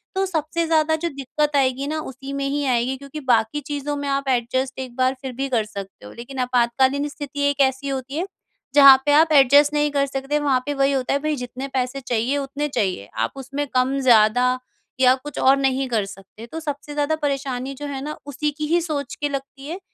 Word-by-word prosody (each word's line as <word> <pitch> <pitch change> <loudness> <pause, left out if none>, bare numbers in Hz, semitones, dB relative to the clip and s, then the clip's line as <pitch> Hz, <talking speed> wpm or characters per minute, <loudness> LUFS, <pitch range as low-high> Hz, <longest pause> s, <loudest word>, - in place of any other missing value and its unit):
तो 385 0 +1
सबसे 335 -1 -1
ज़्यादा 315 -1 +3
जो 340 +2 -2
दिक्क़त 290 +2 -1
आएगी 270 0 +1
ना 310 +1 -2
उसी 270 +1 -8
में 275 0 -2
ही 290 +1 -1
आएगी। 255 +1 +1
क्योंकि 280 +3 -8
बाकी 225 +5 +2
चीज़ों 290 0 -2
में 285 0 -4
आप 275 0 -1
एडज़स्ट 260 +2 -1
एक 255 -2 -6
बार 255 0 +2
फिर 265 -2 -5
भी 270 +2 -2
कर 230 -4 +1
सकते 200 - -9
हो। - - -10
लेकिन 260 +3 -8
आपातकालीन 260 +4 +2
स्थिति 285 -1 -6
एक 285 - -3
ऐसी 265 +2 -9
होती 270 +1 -4
है 355 +4 -2 0.5
जहाँ 275 -2 +10
पे 290 - +3
आप 315 +2 +5
एडज़स्ट 285 +1 +6
नहीं 295 0 +1
कर 280 -1 +2
सकते। 270 +2 -2
वहाँ 280 -3 +2
पे 290 - -1
वही 275 0 +2
होता 265 -2 0
है 280 - +1
भई, 305 +1 -1
जितने 250 +1 -6
पैसे 265 0 -2
चाहिए, 250 +2 0
उतने 280 +1 -3
चाहिए। 185 - -2
आप 110 +1 0
उसमें 275 +2 -4
कम, 260 +1 +1
ज़्यादा 245 +1 +4 0.4
या 255 -1 +6
कुछ 280 +2 -10
और 270 +1 +5
नहीं 270 -1 0
कर 220 -4 0
सकते। 195 +3 -12
तो 320 - -6
सबसे 295 -2 -5
ज़्यादा 295 +1 0
परेशानी 275 -3 -3
जो 290 +2 -7
है 275 -2 -4
ना, 300 +1 -5
उसी 290 +1 -1
की 300 +1 -4
ही 340 +3 +3
सोच 290 -5 -4
के 290 - -2
लगती 275 0 -6
है 340 +5 -5
275 Hz, 220 wpm, -22 LUFS, 255-290 Hz, 0.5 s, जहाँ